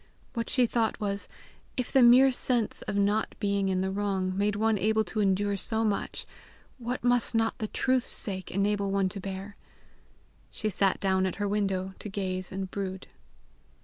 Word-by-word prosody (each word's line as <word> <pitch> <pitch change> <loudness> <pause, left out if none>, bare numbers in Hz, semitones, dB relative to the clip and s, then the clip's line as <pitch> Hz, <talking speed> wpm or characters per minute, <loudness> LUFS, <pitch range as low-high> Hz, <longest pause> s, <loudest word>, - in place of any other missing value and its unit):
What 230 -2 -3
she 250 -2 +3
thought 230 -1 0
was, 200 -2 -2 0.5
if 250 - -2
the 265 - +5
mere 250 +3 +7
sense 245 -3 +1
of - - -2
not 205 +2 +1
being 200 -1 +1
in 185 -1 +1
the 190 0 -1
wrong 190 -2 -1
made 205 +1 +1
one 220 0 +1
able 220 +2 +2
to 215 +2 -4
endure 200 0 +2
so 220 +3 -1
much, 205 -2 -2 0.5
what 245 +1 -4
must 245 -1 +2
not 225 0 +1
the 215 - -2
truth's 255 +3 +1
sake 190 -3 -2
enable 200 +1 0
one 195 -1 +1
to 200 - -6
bear! 195 +1 -6 0.9
She 215 - -2
sat 195 +1 +2
down 190 -1 +2
at 185 - -3
her 205 0 -2
window 195 -2 -1
to 210 - -6
gaze 185 -2 -3
and 190 -1 -4
brood. 190 -2 -5
205 Hz, 180 wpm, -28 LUFS, 190-220 Hz, 0.9 s, mere